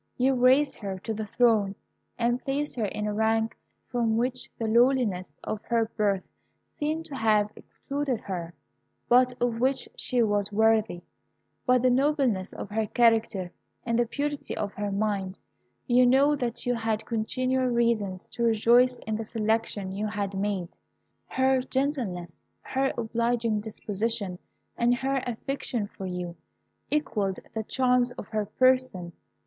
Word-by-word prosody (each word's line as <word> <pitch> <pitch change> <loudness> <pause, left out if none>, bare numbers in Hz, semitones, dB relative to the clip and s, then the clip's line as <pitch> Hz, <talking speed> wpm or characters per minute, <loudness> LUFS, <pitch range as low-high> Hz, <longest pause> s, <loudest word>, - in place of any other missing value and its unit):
You 260 +2 +3
raised 260 +3 +4
her 195 -3 -4
to 220 +4 -4
the 215 0 -4
throne, 215 -3 +3 0.4
and 240 +1 0
placed 285 +2 -2
her 230 -4 -1
in 210 +1 -3
a 210 - -1
rank 220 +1 +1 0.3
from 230 -2 0
which 250 +2 -1
the 225 - -2
lowliness 235 -5 +2
of 215 - -3
her 230 -1 +1
birth 200 -3 +1 0.6
seemed 310 +2 -1
to 285 - -8
have 215 -3 +2
excluded 275 -4 -4
her, 175 -3 -5 0.5
but 250 0 +4
of 240 -2 0
which 260 +2 +1
she 245 -2 +1
was 205 -1 0
worthy, 220 -4 +2 0.6
by 250 0 +6
the 250 +1 +3
nobleness 260 -7 +1
of 205 - -7
her 220 0 0
character 225 -6 +2 0.3
and 230 0 +1
the 240 - +2
purity 290 +3 -3
of 205 -1 -3
her 205 0 -3
mind. 195 -2 -1 0.5
You 245 +1 +5
know 275 +4 +5
that 245 -4 -3
you 245 - +2
had 225 -2 -1
continual 255 +3 0
reasons 230 -6 0
to - - -7
rejoice 235 +3 +4
in 220 -1 -1
the 225 - -3
selection 220 -3 -1
you 205 +3 -2
had 205 -2 -3
made. 195 -3 -2 0.6
Her 260 0 +2
gentleness, 250 - -2 0.2
her 270 0 0
obliging 235 -1 0
disposition, 210 -2 -3 0.4
and 240 +1 +3
her 265 +1 -1
affection 245 -1 -3
for 195 -1 -8
you, 180 -1 -5 0.5
equalled 215 -10 0 0.2
the 220 - -1
charms 250 +1 +2
of - - -8
her 215 -2 -1
person. 255 -7 +2
230 Hz, 150 wpm, -27 LUFS, 205-255 Hz, 0.6 s, by